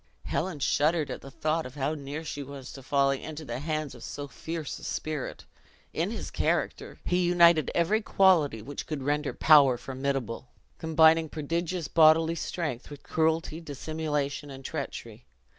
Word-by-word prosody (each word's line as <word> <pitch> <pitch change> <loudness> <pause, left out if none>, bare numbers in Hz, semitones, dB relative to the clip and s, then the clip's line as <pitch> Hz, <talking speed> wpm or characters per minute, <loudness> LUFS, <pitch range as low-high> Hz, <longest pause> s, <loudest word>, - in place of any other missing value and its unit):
Helen 180 -1 -2
shuddered 150 +2 +1
at - - -6
the 135 - -10
thought 155 +4 -1
of 125 -1 -10
how 145 +1 -1
near 145 +1 -6
she 145 -2 -5
was 140 -2 -8
to 135 - -9
falling 135 0 +1
into 155 0 -7
the 120 -1 -4
hands 155 -1 -3
of 120 - -12
so 145 0 -6
fierce 160 +1 -5
a - - -14
spirit. 155 -4 -4 0.5
In - - 0
his - - -5
character, - - -1
he 180 0 +2
united 170 -2 +5
every 195 +6 +2
quality 170 - +3
which 140 +4 -6
could 150 -4 -4
render 145 +1 0
power 140 -5 +6
formidable; 130 -2 -3 0.3
combining 160 0 +4
prodigious 165 +3 -2
bodily 160 0 +5
strength 155 -6 -4
with 145 -1 -11
cruelty, 160 0 0
dissimulation, 150 -1 -3
and 135 -1 -10
treachery. - - -6
150 Hz, 160 wpm, -28 LUFS, 140-160 Hz, 0.5 s, power